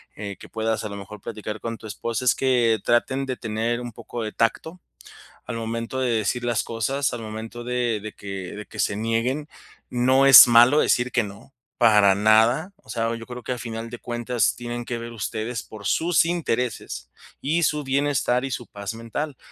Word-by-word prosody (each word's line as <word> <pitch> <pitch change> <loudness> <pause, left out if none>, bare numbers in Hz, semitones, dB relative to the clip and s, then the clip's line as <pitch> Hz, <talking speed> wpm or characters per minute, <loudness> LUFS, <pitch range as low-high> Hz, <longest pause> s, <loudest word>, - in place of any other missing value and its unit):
eh, 100 -1 -6
que - - -12
puedas, 110 0 -1
a 105 - -4
lo 100 - -7
mejor, 100 +1 -10
platicar 105 -1 -6
con 115 0 -5
tu - - -14
esposa, 115 +3 -4
es 125 - +5
que 120 -4 +2
traten 130 +3 +1
de 130 -1 -3
tener 115 +2 -2
un 120 -1 -7
poco 120 +2 -6
de 110 - -4
tacto, 160 +10 -1 0.6
al 120 - -5
momento 115 +3 -3
de 130 -2 +1
decir 115 +2 0
las 120 -2 0
cosas, 135 +5 -1
al 120 - -5
momento 110 +2 -7
de 120 -2 -1
de 110 +1 -7
que 95 -2 -7
de 105 - -7
que 105 - -7
se 100 - 0
nieguen, 115 +7 -1 0.4
no 130 +2 +3
es 135 -2 +11
malo 120 +5 +7
decir 120 +1 +2
que 120 - +2
no, 100 +6 -11 0.3
para 105 -4 +6
nada. 110 - +3
O 200 - -27
sea, 115 0 -1
yo 115 0 -9
creo 125 0 -8
que 125 - -3
a 125 - -3
final 115 -1 -6
de 120 - -7
cuentas 120 0 -1
tienen 120 0 -5
que 120 - -3
ver 115 0 -7
ustedes 115 +1 -4
por 105 -2 -11
sus 165 - +3
intereses, 125 - -2 0.3
y 160 +5 +1
su 150 -1 0
bienestar, 135 -2 +1
y - - -6
su 120 -2 -4
paz 100 +2 -6
mental. 125 +6 -5
115 Hz, 200 wpm, -24 LUFS, 110-125 Hz, 0.6 s, es